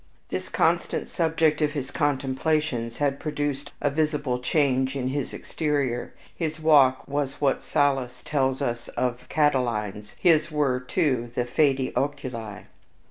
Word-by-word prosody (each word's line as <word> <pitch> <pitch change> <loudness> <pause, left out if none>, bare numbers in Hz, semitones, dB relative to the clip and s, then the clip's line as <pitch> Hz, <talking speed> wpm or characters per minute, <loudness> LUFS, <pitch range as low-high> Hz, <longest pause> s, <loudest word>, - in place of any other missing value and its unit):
This - - -4
constant - - +1
subject 160 -2 +1
of 150 0 +1
his 135 -4 -4
contemplations 135 -3 0
had 140 -1 0
produced 145 -2 -3
a 145 - +1
visible 150 -4 0
change 130 0 +1
in 130 -2 -1
his 140 0 -2
exterior, 140 -6 -2 0.2
his 160 -2 -3
walk 145 -5 +4
was 140 -1 -2
what 140 -2 +1
Sallust 135 -2 0
tells 135 -2 0
us 120 -3 -2
of 125 0 -2
Catiline's, 115 -8 0
his 160 -2 +4
were, 140 -4 +1
too, 125 -3 0
the 120 - 0
"faedi 135 0 +1
oculi." 115 -7 -3
140 Hz, 135 wpm, -25 LUFS, 125-150 Hz, 0.2 s, walk